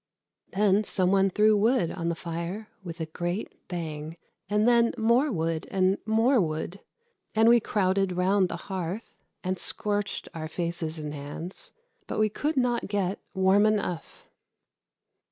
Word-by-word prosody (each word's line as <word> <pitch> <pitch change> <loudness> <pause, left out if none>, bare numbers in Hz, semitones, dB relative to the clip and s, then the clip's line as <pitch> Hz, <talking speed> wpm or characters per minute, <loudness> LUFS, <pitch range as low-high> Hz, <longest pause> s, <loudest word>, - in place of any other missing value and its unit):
Then 200 +1 +3
some 185 -2 +3
one 195 0 +4
threw 210 +3 +4
wood 220 -3 +2
on 170 -2 -3
the 170 - -1
fire 170 +6 -5
with 170 -1 -7
a 160 - -2
great 175 +5 -5
bang, 160 -2 -5 0.3
and 210 +2 +2
then 235 -1 +4
more 240 +6 +3
wood 165 -4 -2
and 190 +1 +2
more 225 +3 +4
wood, 160 +3 -3 0.6
and 220 +1 +5
we 240 +1 +7
crowded 195 -3 +1
round 185 +1 +2
the - - -3
hearth 190 +2 -4 0.3
and 185 0 -2
scorched 205 -1 0
our 160 -1 -5
faces 170 -1 -2
and 150 -1 -5
hands, 160 - -6 0.4
but - - -4
we 215 0 +3
could 295 +8 -2
not 245 -2 +1
get 195 -1 -1 0.2
warm 190 +2 +4
enough. 200 -6 -2
190 Hz, 150 wpm, -27 LUFS, 170-215 Hz, 0.6 s, we